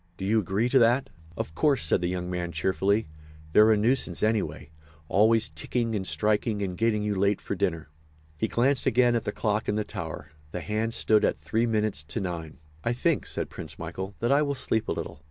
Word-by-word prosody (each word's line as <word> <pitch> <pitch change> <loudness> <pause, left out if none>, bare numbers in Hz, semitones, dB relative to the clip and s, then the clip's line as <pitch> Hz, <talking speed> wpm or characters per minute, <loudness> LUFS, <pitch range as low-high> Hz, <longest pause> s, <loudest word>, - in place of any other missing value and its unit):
Do 95 - -4
you 110 +3 +3
agree 100 +4 0
to 135 - +5
that?" 120 +1 +3 0.3
"Of 80 - -4
course," 140 - +2
said 80 - +2
the 90 - 0
young 90 -1 -3
man, 90 -1 -3
cheerfully, 95 +6 +1 0.5
"they're 110 +1 +7
a 110 - +4
nuisance, 110 -5 +1
anyway—always 95 +1 0
ticking 115 +10 -2
and 95 -3 -1
striking 105 +1 0
and 90 -2 -3
getting 110 0 +1
you 105 0 0
late 100 +1 +1
for - - -4
dinner." 90 -6 -1 0.5
He 75 - -1
glanced 130 +3 +2
again 120 +1 +4
at 115 - -1
the - - -1
clock 105 0 -1
in 105 - +1
the 105 - 0
tower. 80 -5 -7 0.2
The 90 - -5
hands 110 +3 -2
stood 110 -1 +3
at - - +1
three 115 +2 0
minutes 110 -7 0
to 75 - -4
nine. 85 -5 -5 0.3
"I 120 - +1
think," 155 +5 0
said - - -2
Prince - - -8
Michael, 95 +1 -6
"that 120 +3 +1
I 140 +2 +5
will 140 -1 0
sleep 110 -4 0
a - - -1
little. - - -5
105 Hz, 210 wpm, -27 LUFS, 90-115 Hz, 0.5 s, they're